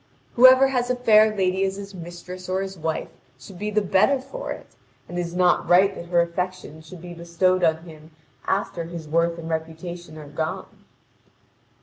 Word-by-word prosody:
Whoever 255 +2 +7
has 250 -2 -1
a 250 - +1
fair 220 -3 +5
lady 190 -1 +1
as 195 0 -1
his 200 0 -9
mistress 180 +1 -9
or 190 +1 0
his 195 0 -7
wife 160 -2 -3 0.3
should 190 -3 -13
be 210 +1 -2
the 210 0 +1
better 210 +8 +3
for - - -7
it, - - -7 0.4
and 175 - -5
it - - +1
is 170 0 -5
not 180 -1 +2
right 190 +3 +5
that 170 - -9
her 175 0 +3
affection 170 -2 -4
should 165 +2 -12
be 175 -1 -8
bestowed 175 +2 0
on 160 -1 +2
him 155 -2 -13 0.4
after 185 -3 -1
his 165 -2 -8
worth 170 +2 +1
and 165 -1 -7
reputation 160 +1 -6
are 150 -1 -10
gone. 155 +2 -5
180 Hz, 190 wpm, -23 LUFS, 170-195 Hz, 0.4 s, Whoever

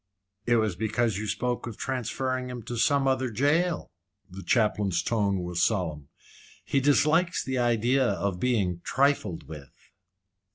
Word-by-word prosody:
"It 120 - +4
was 110 -5 +1
because 110 +1 0
you 110 - -4
spoke 120 +4 -2
of 115 - -7
transferring 130 0 -2
him 125 -2 -7
to 120 - -5
some 140 +3 +2
other 130 -1 +1
jail." 150 +9 0 0.4
The 95 +2 -8
chaplain's 105 -6 +1
tone 100 -4 0
was 90 -1 -2
solemn. 85 -8 0 0.6
"He 140 - +1
dislikes 155 +5 +2
the 130 -1 -2
idea 120 +2 +2
of 100 -6 -1
being 95 -7 0
trifled 135 - 0
with." 75 -5 -11
120 Hz, 140 wpm, -27 LUFS, 100-130 Hz, 0.6 s, It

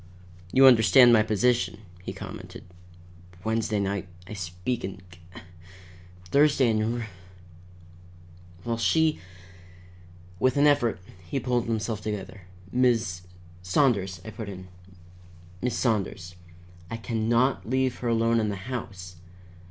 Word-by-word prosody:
"You 135 +1 +6
understand 120 0 +7
my 110 - +6
position," 110 +2 +1 0.2
he - - -6
commented. - - -9 0.8
"Wednesday 110 -1 0
night 100 -1 -2 0.2
I 105 - -9
speak 90 +5 -4
in 95 0 -5
C, 85 - -17 1.1
Thursday, 140 -4 +4
in 110 +2 0
R, 115 - -5 1.6
while 115 -1 -2
she 160 +6 +2 0.6
" 90 0 -22
With 130 +1 +2
an 145 - +5
effort 120 -9 +3 0.3
he 135 - -1
pulled 125 -2 0
himself 110 -1 -2
together. 100 -2 -5 0.3
"Miss 115 -8 +1 0.2
" 85 0 -22
"Saunders," 100 -10 +2
I 110 - -7
put 110 -1 -7
in. 95 -1 -9 0.9
"Miss 125 -1 -1
Saunders, 100 -6 -1 0.6
I 115 - -4
can 110 -1 -2
not 120 0 +1
leave 130 0 0
her 125 - -3
alone 115 0 +2
in 110 -1 0
the 100 - -3
house. 95 -5 -7
110 Hz, 130 wpm, -26 LUFS, 95-125 Hz, 1.6 s, understand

